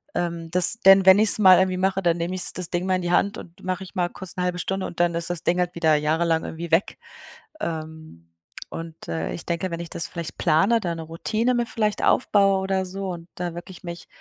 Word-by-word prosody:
ähm, 170 -1 -3
das 180 +5 +3
denn 195 0 +7
wenn 190 +1 +8
ich's 215 0 +5
mal 185 -3 +8
irgendwie 185 -1 +1
mache, 190 +1 0
dann 170 -1 +2
nehme 175 +2 -3
ich's 185 - 0
das 180 -2 -4
Ding 175 +1 -2
mal 185 - +2
in - - -4
die 175 - -1
Hand 200 +3 +2
und 170 0 -14
mache 185 +1 -3
ich 190 - -13
mal 180 -2 +1
kurz 190 -1 -7
1/2 180 0 -1
Stunde 190 +1 -2
und 170 - -10
dann 175 -1 +2
ist 170 0 -2
das 175 -2 -4
Ding 175 +1 +1
halt 180 0 -1
wieder 160 -2 +3
jahrelang 160 +2 +1
irgendwie 165 0 -7
weg. 165 +4 +1 0.6
Ähm, 155 - -7 0.4
und, 165 -1 -8
äh, 80 0 -3
ich 170 - -7
denke, 170 +2 -2
wenn 170 - -4
ich 170 - -8
das 165 - -3
vielleicht 170 -2 -7
plane, 195 +10 +3
da 170 -3 -2
'ne 165 - -6
Routine 215 +9 -1
mir 240 0 0
vielleicht 215 -2 -1
aufbaue 195 -5 +3
oder 190 -1 -1
so 190 +1 -5
und 170 -1 -7
da 175 -1 -4
wirklich 180 +2 -10
mich 170 -1 -8
175 Hz, 235 wpm, -23 LUFS, 165-190 Hz, 0.6 s, wenn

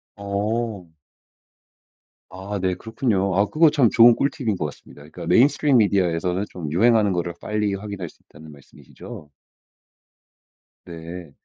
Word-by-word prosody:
어. 100 0 -3 1.4
아 95 +2 -6
네. 95 -1 0
그렇군요. 105 -4 -2
아. 100 - +3
그거 155 +8 +3
참 140 -6 +3
좋은 115 +1 +6
꿀팁인 130 -6 -1
것 85 - -3
같습니다. 75 - -11
그러니까 - - -10
메인 130 +4 +5
스트림 145 -2 +1
미디어에서는 90 -3 +1
좀 80 -5 -7
유행하는 110 +2 +3
거를 85 -1 -3
빨리 105 -1 -2
확인할 100 -4 -7
수 - - -23
있다는 80 +2 -15
말씀이시죠? 70 +1 -13 1.6
네. 85 -1 -9
100 Hz, 305 characters per minute, -22 LUFS, 90-115 Hz, 1.6 s, 좋은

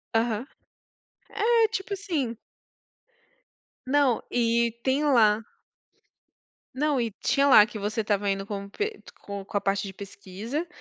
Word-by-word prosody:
Aham. 230 +2 0 1.0
É, 460 -2 +5
tipo, 405 -2 -4
assim 325 -12 -2 1.5
Não, 275 -3 +2
e 235 -1 +2
tem 270 +3 +1
lá 225 -6 +4 1.3
não, 295 -2 +1
e 230 -1 0
tinha 280 0 +3
lá, 210 -6 +8
que 215 -2 -8
você 215 +2 -1
estava 205 -1 0
indo 195 0 -1
com 200 -1 -5
p 425 - -4 0.2
co 200 -1 -7
com 205 - -3
a - - 0
parte 195 0 0
de 190 - -8
pesquisa. 200 - -6
230 Hz, 135 wpm, -26 LUFS, 205-285 Hz, 1.5 s, lá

